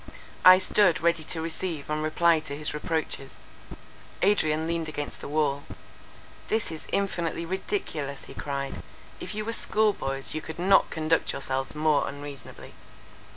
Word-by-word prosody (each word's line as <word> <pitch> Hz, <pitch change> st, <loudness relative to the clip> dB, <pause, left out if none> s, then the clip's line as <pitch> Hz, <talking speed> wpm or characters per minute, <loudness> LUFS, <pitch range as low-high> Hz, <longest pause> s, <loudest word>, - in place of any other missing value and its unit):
I 185 Hz, 0 st, +10 dB
stood 185 Hz, -1 st, +3 dB
ready 170 Hz, -1 st, +2 dB
to 160 Hz, 0 st, -2 dB
receive 165 Hz, -2 st, -3 dB
and 150 Hz, 0 st, -1 dB
reply 165 Hz, +1 st, +3 dB
to 145 Hz, -2 st, -6 dB
his 150 Hz, 0 st, -2 dB
reproaches. 150 Hz, -3 st, -3 dB, 0.9 s
Adrian 160 Hz, -6 st, +3 dB
leaned 165 Hz, -1 st, -2 dB
against 145 Hz, -1 st, -5 dB
the -, -, -6 dB
wall. 145 Hz, -1 st, +1 dB, 0.9 s
"This 220 Hz, -5 st, 0 dB
is 160 Hz, -, -8 dB
infinitely 170 Hz, -4 st, -1 dB
ridiculous," 165 Hz, -, -3 dB
he -, -, -11 dB
cried, 140 Hz, -1 st, -4 dB, 0.4 s
"if -, -, -6 dB
you 215 Hz, 0 st, -3 dB
were 230 Hz, -, -2 dB
school 215 Hz, -2 st, +2 dB
boys, 135 Hz, -5 st, -3 dB
you 155 Hz, -, -3 dB
could 160 Hz, -, -8 dB
not 190 Hz, +3 st, +4 dB
conduct 160 Hz, +1 st, +1 dB
yourselves 135 Hz, 0 st, -3 dB
more 150 Hz, -1 st, +2 dB
unreasonably." 145 Hz, 0 st, -9 dB
160 Hz, 150 wpm, -27 LUFS, 145-175 Hz, 0.9 s, I